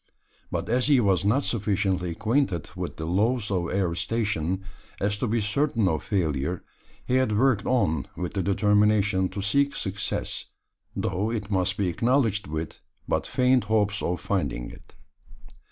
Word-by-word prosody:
But - - -3
as 125 +3 +1
he 145 -3 +5
was 95 -5 +2
not 120 +8 +2
sufficiently 95 -4 0
acquainted 110 - 0
with - - -5
the 80 - -4
laws 105 +6 +1
of 90 -3 0
aerostation 95 -1 -1 0.4
as 100 +1 +1
to 125 - 0
be 115 +1 +1
certain 115 0 +1
of 80 -3 0
failure, 85 -3 -1 0.4
he 125 - +2
had 110 -5 +2
worked 125 -4 +2
on 80 - +1
with 90 -1 -3
the 100 - 0
determination 100 0 +3
to 95 +1 -5
seek 140 +7 +2
success, 95 0 -3 0.5
though 95 +3 -1
it 105 -3 -4
must 95 0 +1
be 100 - +1
acknowledged 115 +1 +1
with 80 +1 -5 0.3
but - - 0
faint 125 -1 +3
hopes 105 -1 +1
of 90 0 -1
finding - - -2
it. - - -16
100 Hz, 155 wpm, -26 LUFS, 90-115 Hz, 0.5 s, he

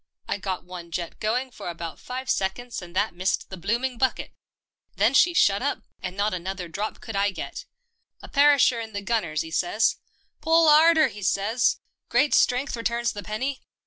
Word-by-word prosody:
I - - -2
got 190 -1 -3
one 180 -1 -9
jet 170 0 -5
going 250 +5 -1
for 180 - -7
about 170 -1 -6
five 255 +1 -6
seconds 235 +5 -2
and 175 0 -11
that 205 +1 +1
missed 185 +3 -2
the - - -5
blooming 235 +7 -2
bucket. 260 - 0 0.6
Then - - +3
she 350 -1 +5
shut 200 -9 +4
up, 285 +2 -2 0.2
and 185 +1 -6
not 205 0 +1
another 185 0 -4
drop 200 +6 -4
could 225 - -7
I 200 +1 +2
get. 350 - -7 0.5
A - - -11
perisher 280 -4 +4
in 225 -1 -7
the 200 0 -4
gunners, 180 -9 -1
'e 160 - -9
says, 180 +7 +1 0.2
' - - -42
Pull 325 0 +4
'arder,' 315 +1 +6
'e 205 - -10
says, 205 +5 +1
' - - -56
Great 295 - +3
strength 250 +2 +2
returns 235 0 -1
the 205 - -7
penny.' 255 +8 -3
215 Hz, 190 wpm, -25 LUFS, 185-255 Hz, 0.6 s, arder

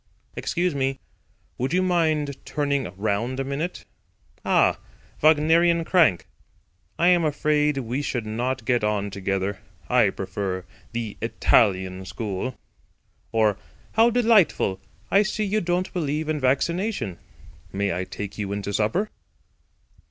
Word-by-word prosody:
"Excuse 175 -1 -1
me. 135 -1 -1 0.6
Would 130 +5 -1
you 185 +1 +3
mind 155 -6 0
turning 140 -8 -1
round 110 +5 -1
a - - 0
minute? 140 +6 -4 0.6
Ah, - - +3 0.4
'Wagnerian 165 +2 +4
Crank!' 160 - +3 0.7
I 175 - +4
am 175 -2 +4
afraid 150 -1 +1
we 125 +1 -2
should 125 -5 -2
not 120 +3 -2
get 120 -1 +1
on 105 -1 0
together. 95 0 -2 0.3
I - - +4
prefer 95 -2 -4 0.3
the 115 -3 -4
Italian 95 -1 +2
school." 105 +5 -4 0.7
Or, 110 -3 +2 0.3
"How 225 +2 +5
delightful. 220 - +3 0.3
I 200 - +6
see 210 +1 -1
you 210 +2 0
don't 175 +1 -1
believe 155 -2 -2
in 155 -1 0
vaccination. 140 - 0 0.5
May 100 -1 -1
I 90 +2 -2
take 100 +2 -7
you 100 -2 -3
into 100 0 -3
supper?" 110 - 0
135 Hz, 125 wpm, -24 LUFS, 105-170 Hz, 0.7 s, I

